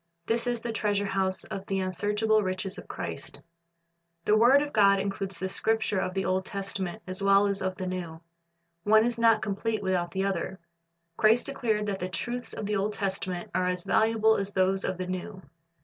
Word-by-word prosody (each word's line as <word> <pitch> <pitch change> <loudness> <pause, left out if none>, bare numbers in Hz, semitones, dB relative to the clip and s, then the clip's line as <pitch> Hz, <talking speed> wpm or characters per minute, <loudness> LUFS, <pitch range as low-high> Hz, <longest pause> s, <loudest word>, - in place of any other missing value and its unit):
This 230 +4 0
is 240 -1 -1
the 235 - -3
treasure 205 -2 0
house 190 -1 -1
of 195 - -6
the 195 -1 0
unsearchable 210 +4 +1
riches 190 0 -3
of - - -12
Christ. - - -6 0.9
The 210 - +4
word 250 +6 +6
of 295 - -6
God 200 -2 +5
includes 195 0 -3
the 190 - -2
Scriptures 220 0 0
of 185 - -3
the 190 - 0
Old 185 0 +1
Testament 195 -1 -5
as 185 +1 -4
well 195 +1 +5
as 200 -1 -1
of 185 0 -1
the 185 - -6
N.ew. 180 -3 -4 0.6
One 220 +1 +5
is 235 -1 -1
not 230 -1 +4
complete 215 +1 -2
without 180 -2 0
the 190 +2 -1
other. 190 -1 -2 0.6
Christ 225 +2 +4
declared 225 -6 -1
that 200 -2 -2
the 180 - -3
truths 245 +6 -4
of 215 - -5
the 210 0 0
Old 205 +2 -1
Testament 190 -3 -3
are 180 - +1
as 180 -1 -1
valuable 220 0 +3
as 200 0 -2
those 190 0 +2
of 185 - -2
the 185 - -3
New. 185 +1 -5
195 Hz, 195 wpm, -28 LUFS, 190-220 Hz, 0.9 s, word